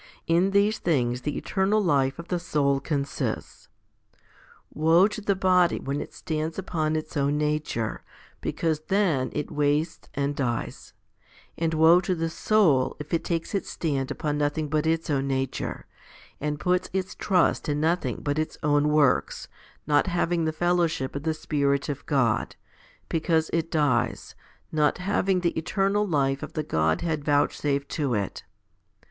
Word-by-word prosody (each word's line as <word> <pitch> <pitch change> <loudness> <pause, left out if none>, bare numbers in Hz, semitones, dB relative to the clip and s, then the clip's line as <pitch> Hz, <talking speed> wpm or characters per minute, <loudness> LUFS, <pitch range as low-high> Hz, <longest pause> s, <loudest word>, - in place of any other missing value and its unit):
In 170 +3 +3
these 200 +2 +2
things 125 -7 0
the 150 +3 -3
eternal 200 +2 +1
life 140 -8 +1
of 170 +1 -9
the 180 - 0
soul 140 -5 +1
consists. 140 0 -3 1.0
Woe 165 +5 +5
to 215 - -6
the 200 -1 +1
body 185 -2 +3
when 140 +2 -3
it - - -8
stands 155 +1 -4
upon 160 -5 -1
its 155 +1 -4
own 145 0 +1
nature, 150 -7 -1 0.4
because 160 -2 -1
then 180 -10 +1
it 150 - -4
wastes 150 +2 0
and 140 0 -1
dies; 120 -4 -3 0.6
and 165 -1 -1
woe 165 +3 +6
to 185 0 -1
the 165 -1 -2
soul 160 -11 +2
if 150 +2 -8
it 165 - +1
takes 165 -2 -2
its 200 - -2
stand 140 -5 -2
upon 150 0 -2
nothing 150 +1 -1
but 155 +2 0
its 165 0 0
own 135 -1 0
nature, 135 -1 -3 0.5
and 150 0 -2
puts 180 +2 0
its 190 -1 -2
trust 180 -4 +1
in 145 0 0
nothing 160 -6 0
but 145 +1 0
its 155 - -3
own 145 0 +3
works, 150 -3 +2 0.4
not 145 +3 +3
having 175 -1 0
the 160 - +1
fellowship 170 -5 0
of 140 - -3
the 160 +1 0
Spirit 140 -2 0
of 145 -1 -4
God, 130 -7 +1 0.5
because 160 -1 0
it 165 0 0
dies, 140 -7 0 0.4
not 150 -1 +2
having 190 0 0
the 170 -1 0
eternal 195 +5 0
life 135 -5 +1
of - - -7
the 155 - -2
Godhead 140 - 0
vouchsafed 145 -1 +1
to 140 -6 -1
it. 100 -2 -3
155 Hz, 155 wpm, -26 LUFS, 140-175 Hz, 1.0 s, woe